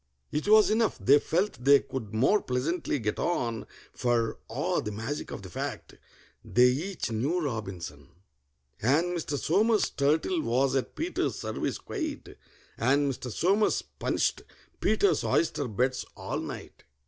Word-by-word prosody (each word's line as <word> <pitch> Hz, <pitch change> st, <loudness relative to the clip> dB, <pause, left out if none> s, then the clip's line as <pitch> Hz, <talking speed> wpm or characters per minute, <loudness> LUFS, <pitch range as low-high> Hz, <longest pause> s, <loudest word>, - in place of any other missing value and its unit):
It 150 Hz, +6 st, -2 dB
was 215 Hz, 0 st, +6 dB
enough: 220 Hz, 0 st, +2 dB
they 140 Hz, +2 st, +5 dB
felt 175 Hz, -5 st, -1 dB
they 140 Hz, +1 st, +7 dB
could 125 Hz, -6 st, -6 dB
more 135 Hz, -, +3 dB
pleasantly 145 Hz, +6 st, -1 dB
get 110 Hz, -4 st, -2 dB
on, 115 Hz, -10 st, -1 dB, 0.3 s
For 120 Hz, -2 st, 0 dB
(ah, -, -, 0 dB
the 105 Hz, -, -4 dB
magic 115 Hz, +8 st, -4 dB
of -, -, -7 dB
the 95 Hz, -, -8 dB
fact!) -, -, -5 dB, 0.5 s
they 125 Hz, +1 st, +5 dB
each 160 Hz, +2 st, -2 dB
knew 135 Hz, +11 st, 0 dB
ROBINSON! 95 Hz, -, -5 dB, 0.7 s
And 140 Hz, +9 st, +3 dB
Mr. 155 Hz, -4 st, -2 dB
SOMERS' 210 Hz, +9 st, +2 dB
turtle 155 Hz, +5 st, +1 dB
was 130 Hz, +2 st, +1 dB
at 135 Hz, -, -2 dB
PETER'S 335 Hz, +3 st, -1 dB
service -, -, -3 dB
quite, 315 Hz, -8 st, -5 dB, 0.4 s
And 140 Hz, +4 st, +3 dB
Mr. 125 Hz, +1 st, -7 dB
SOMERS 195 Hz, -, +2 dB, 0.2 s
punished -, -, 0 dB, 0.4 s
PETER'S 210 Hz, -2 st, +2 dB
oyster 165 Hz, -5 st, +1 dB
beds 125 Hz, +4 st, 0 dB
all -, -, -3 dB
night. -, -, -8 dB
140 Hz, 140 wpm, -28 LUFS, 120-180 Hz, 0.7 s, they